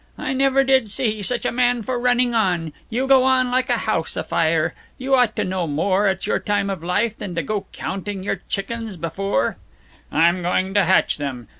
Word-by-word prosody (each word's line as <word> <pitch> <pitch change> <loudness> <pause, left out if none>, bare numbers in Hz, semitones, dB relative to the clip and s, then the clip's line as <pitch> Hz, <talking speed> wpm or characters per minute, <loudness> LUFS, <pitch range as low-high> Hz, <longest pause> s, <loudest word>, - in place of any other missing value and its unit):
"I 265 - -3
never 270 0 +3
did 265 -4 +3
see 215 -1 -1
such 240 +5 -2
a - - +1
man 245 -1 +1
for 250 +2 -2
running 245 0 +2
on. 175 -8 0 0.2
You 245 +4 -1
go 265 -1 +5
on 255 -1 +2
like 255 +1 +1
a 240 - +2
house 190 -8 -2
afire. 160 -1 +1 0.2
You 265 +1 -2
ought 245 -4 +4
to - - 0
know 185 -2 -2
more, 185 +7 +1
at 190 - -1
your - - 0
time 205 -1 -1
of 185 -4 -5
life, 205 +6 0
than 190 -6 -6
to 165 - -1
go 205 +6 -3
counting 195 0 -5
your - - -2
chickens 220 0 -4
before 170 -1 -1 0.3
" - - -30
"I'm 170 +3 +3
going 185 +2 0
to 200 -3 +3
hatch 190 +2 +3
them. 130 -6 -5
205 Hz, 205 wpm, -21 LUFS, 180-245 Hz, 0.3 s, go